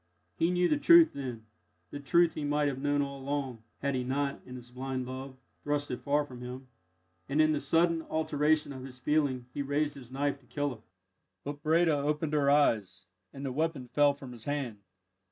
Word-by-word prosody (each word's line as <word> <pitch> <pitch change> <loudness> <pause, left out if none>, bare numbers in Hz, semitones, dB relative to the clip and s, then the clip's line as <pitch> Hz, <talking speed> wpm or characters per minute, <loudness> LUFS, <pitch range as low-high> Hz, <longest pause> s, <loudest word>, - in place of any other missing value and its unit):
He 165 - +2
knew 180 0 +2
the 295 - +1
truth 335 0 +7
then 125 -5 -6 0.5
the 145 - -5
truth 170 +4 +3
he 155 - -4
might 145 0 +1
have 135 -2 -2
known 145 0 +2
all 140 0 -6
along, 135 -4 -3 0.2
had 140 0 +1
he 130 -1 -1
not, 140 +2 -1
in 125 - -8
his 125 -1 -11
blind 130 0 -4
love, 130 +1 -7 0.3
thrust 145 -1 -1
it 125 - -3
far 145 +1 +1
from 125 -4 -11
him 125 +1 -7 0.6
and, 140 +3 0
in 155 0 +5
the 150 - +1
sudden 165 +1 +2
alteration 150 -1 +1
of 130 -1 -8
his 130 -1 -9
feeling, 135 -2 0
he 145 - -2
raised 145 +1 0
his 130 -3 -11
knife 140 +1 -1
to 130 - -26
kill 145 -2 -2
her. 110 - -15 0.6
But 145 +1 -6
Breda 165 +1 +3
opened 150 +2 -1
her 145 -2 +3
eyes, 105 -10 +2 0.3
and 140 0 -7
the 135 - -2
weapon 145 -3 -2
fell 145 +1 +4
from 135 -3 -10
his 120 -2 -10
hand. 140 -7 -3
140 Hz, 205 wpm, -30 LUFS, 130-150 Hz, 0.6 s, truth